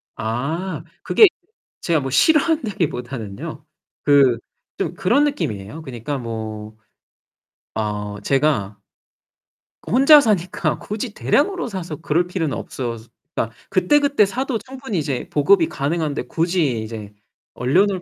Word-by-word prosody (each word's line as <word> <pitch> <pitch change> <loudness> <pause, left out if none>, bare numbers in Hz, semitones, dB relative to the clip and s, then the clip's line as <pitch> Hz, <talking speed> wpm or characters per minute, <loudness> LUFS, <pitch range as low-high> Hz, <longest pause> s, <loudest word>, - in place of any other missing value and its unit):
아. 155 - -3 0.2
그게 435 - +7 0.6
제가 165 -3 +2
뭐 135 -1 -3
싫어한다기보다는요. 155 - 0 0.4
그 140 -5 +5 0.4
좀 - - -1
그런 245 +10 +2
느낌이에요. 145 - -3
그니까 135 0 -5
뭐 110 -2 -6 1.0
어 105 -1 -3
제가 135 -8 +1 1.1
그 - - -8
혼자 275 +5 +8
사니까 190 -6 0
굳이 210 +1 -5
대량으로 360 - +1
사서 175 -8 -5
그럴 170 +2 0
필요는 165 -6 -2
없어서. 120 -3 -5 0.3
그러니까 115 0 -2
그때그때 285 +2 +3
사도 250 +3 -2
충분히 255 -2 -6
이제 140 -4 -3
보급이 165 +3 +4
가능한데 150 +1 -1
굳이 165 -9 0
이제 110 -2 -7 0.4
얼려놓을 185 +10 +2
155 Hz, 275 characters per minute, -21 LUFS, -, 1.1 s, 혼자